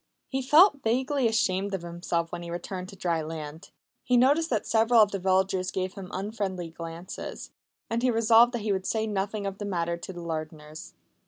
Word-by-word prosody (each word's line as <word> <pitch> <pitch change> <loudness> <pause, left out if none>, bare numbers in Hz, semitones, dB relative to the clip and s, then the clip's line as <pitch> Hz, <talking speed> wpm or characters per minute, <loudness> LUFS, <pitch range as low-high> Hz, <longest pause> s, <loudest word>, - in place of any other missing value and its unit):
He 270 0 -1
felt 295 +3 +6
vaguely 260 +3 +1
ashamed 200 -3 0
of 180 - -6
himself 170 -1 -3
when 175 - -5
he 170 - -7
returned 180 +2 -5
to 200 - -11
dry 170 -3 -1
land. 155 0 -7 0.3
He 250 - +3
noticed 290 +6 +4
that 220 -5 0
several 225 +1 +4
of 210 -2 +5
the 195 - -3
villagers 190 0 +1
gave 185 -1 -3
him 190 -2 -9
unfriendly 190 -4 -4
glances; 165 +2 -8 0.4
and 230 +1 -1
he 255 - +2
resolved 230 +1 +5
that 235 -3 -3
he 215 - 0
would 190 0 -3
say 220 -1 0
nothing 205 0 -2
of 195 0 -4
the 205 - -4
matter 170 -3 -1
to 170 - -8
the 175 -2 -8
Lardners. 155 -1 -6
195 Hz, 195 wpm, -27 LUFS, 170-225 Hz, 0.4 s, felt